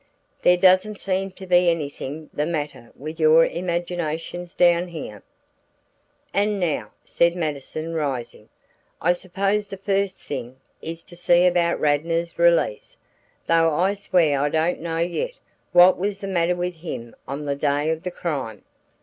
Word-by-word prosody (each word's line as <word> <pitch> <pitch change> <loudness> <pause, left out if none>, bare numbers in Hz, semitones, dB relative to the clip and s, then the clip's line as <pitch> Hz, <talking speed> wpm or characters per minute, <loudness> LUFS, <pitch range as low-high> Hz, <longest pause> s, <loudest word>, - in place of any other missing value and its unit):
There 180 0 +5
doesn't 185 +3 +4
seem 190 0 -1
to 190 - -10
be 180 -1 +4
anything 150 -1 -4
the 150 +1 -1
matter 145 -7 -4
with 155 +4 -7
your 160 +1 +6
imaginations 175 0 -3
down 175 0 +4
here." 145 - -8 1.1
"And 205 0 +1
now," 170 -5 -1
said 170 0 +2
Mattison, 155 0 -4
rising, 130 -8 -4 0.5
"I 175 - +3
suppose 195 +3 -1
the 195 - -7
first 195 0 -1
thing, 130 -3 -6 0.3
is 165 +1 -6
to 175 - -13
see 175 0 +4
about 175 -1 +2
Radnor's 165 +3 0
release, 170 -10 +2 0.5
though 165 -2 +3
I 185 +5 +2
swear 175 -8 +2
I 145 +1 +1
don't 160 +3 0
know 165 0 -3
yet 175 - -1 0.4
what 180 +1 +7
was 200 +1 -2
the 195 - -5
matter 175 -2 +1
with 175 -1 -3
him 120 -8 -7
on 140 +2 -5
the 140 - 0
day 145 +2 0
of 160 0 -3
the 180 - -3
crime." 140 - -4
170 Hz, 150 wpm, -23 LUFS, 150-180 Hz, 1.1 s, what